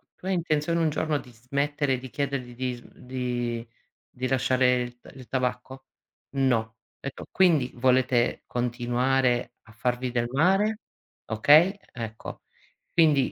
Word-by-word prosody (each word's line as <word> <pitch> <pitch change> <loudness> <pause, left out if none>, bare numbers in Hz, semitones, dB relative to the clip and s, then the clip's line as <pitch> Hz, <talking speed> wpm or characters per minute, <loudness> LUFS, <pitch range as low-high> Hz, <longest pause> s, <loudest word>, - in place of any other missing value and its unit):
"Tu 185 - -10
hai 190 - +1
intenzione 160 -1 0
un 160 -2 +3
giorno 155 -1 0
di 130 -2 -10
smettere, 140 +4 -1
di 130 0 -9
chiedergli 140 -4 -3
di 125 0 -2
sm 120 - -15
di 120 -2 -3 0.4
di 130 0 -4
lasciare 130 -1 +3
il 120 0 -9
t - - -15
il 130 -2 -11
tabacco?" 130 +1 -3 0.5
"No." 115 -5 +1 0.2
Etto: 140 - -7
"Quindi 160 -9 +3
volete 125 -1 +2
continuare 125 +1 0
a - - -17
farvi 125 +2 -2
del 120 -1 0
mare?" 195 - +2 0.4
Okay, 150 - +5 0.2
ecco, 115 -2 -7 0.5
quindi 150 -6 +4
130 Hz, 135 wpm, -26 LUFS, 120-145 Hz, 0.5 s, Okay